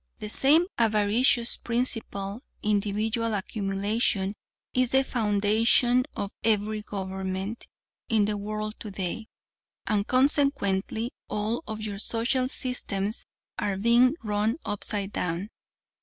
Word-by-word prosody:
"The 210 Hz, -, -6 dB
same 295 Hz, +9 st, +4 dB
avaricious 230 Hz, +2 st, +3 dB
principal 225 Hz, -3 st, -2 dB, 0.2 s
individual 215 Hz, +2 st, 0 dB
accumulation 200 Hz, 0 st, 0 dB, 0.4 s
is 255 Hz, -1 st, +2 dB
the 265 Hz, +1 st, +4 dB
foundation 230 Hz, +2 st, +3 dB
of 200 Hz, -, -3 dB
every 215 Hz, -1 st, +1 dB
government 190 Hz, +1 st, -4 dB, 0.4 s
in 220 Hz, -3 st, +4 dB
the 210 Hz, 0 st, -1 dB
world 215 Hz, +1 st, -3 dB
today, 200 Hz, +1 st, -4 dB, 0.6 s
and 210 Hz, -1 st, 0 dB
consequently 255 Hz, -5 st, +2 dB
all 215 Hz, +7 st, -1 dB
of 220 Hz, 0 st, -5 dB
your 205 Hz, -2 st, -4 dB
social 240 Hz, +4 st, +1 dB
systems 220 Hz, -5 st, -2 dB, 0.3 s
are 200 Hz, -2 st, -1 dB
being 240 Hz, +6 st, +4 dB
run 210 Hz, +3 st, 0 dB
upside 205 Hz, -1 st, -2 dB
down. 180 Hz, +5 st, -2 dB
215 Hz, 105 wpm, -27 LUFS, 200-235 Hz, 0.6 s, same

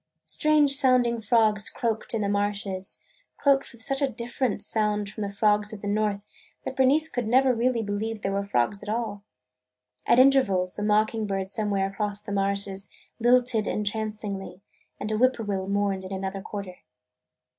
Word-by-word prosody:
Strange 305 Hz, -2 st, +3 dB
sounding 255 Hz, -4 st, +3 dB
frogs 215 Hz, -2 st, +2 dB
croaked 230 Hz, 0 st, -3 dB
in 220 Hz, -, -1 dB
the 200 Hz, -, 0 dB
marshes, 200 Hz, -2 st, -2 dB, 0.4 s
croaked 275 Hz, -1 st, +2 dB
with 235 Hz, -2 st, -6 dB
such 275 Hz, +2 st, 0 dB
a 275 Hz, -, +2 dB
different 240 Hz, 0 st, -2 dB
sound 210 Hz, -2 st, 0 dB
from 215 Hz, +2 st, -8 dB
the 200 Hz, -, -2 dB
frogs 210 Hz, +1 st, +1 dB
of 210 Hz, -, -9 dB
the -, -, -3 dB
North, 205 Hz, -1 st, 0 dB, 0.4 s
that -, -, -4 dB
Bernice 280 Hz, +4 st, +3 dB
could 245 Hz, -7 st, -3 dB
never 260 Hz, +2 st, +4 dB
really 235 Hz, 0 st, +1 dB
believe 210 Hz, +1 st, -3 dB
they 195 Hz, -, 0 dB
were 200 Hz, 0 st, -1 dB
frogs 200 Hz, +1 st, 0 dB
at 205 Hz, -, -8 dB
all. 220 Hz, -2 st, -2 dB, 0.9 s
At -, -, +5 dB
intervals 210 Hz, -9 st, +3 dB
a -, -, -2 dB
mocking 215 Hz, +1 st, +1 dB
bird 195 Hz, -1 st, -3 dB
somewhere 205 Hz, -3 st, 0 dB
across 205 Hz, +1 st, -2 dB
the 210 Hz, 0 st, -8 dB
marshes 200 Hz, 0 st, -1 dB, 0.3 s
lilted 240 Hz, -2 st, +3 dB
entrancingly 210 Hz, -2 st, -3 dB, 0.4 s
and 215 Hz, -, -3 dB
a 215 Hz, -, 0 dB
whippoorwill 215 Hz, -6 st, +1 dB
mourned 200 Hz, -1 st, 0 dB
in 185 Hz, -, -8 dB
another 195 Hz, 0 st, -4 dB
quarter. 195 Hz, -3 st, -7 dB
210 Hz, 165 wpm, -26 LUFS, 200-235 Hz, 0.9 s, At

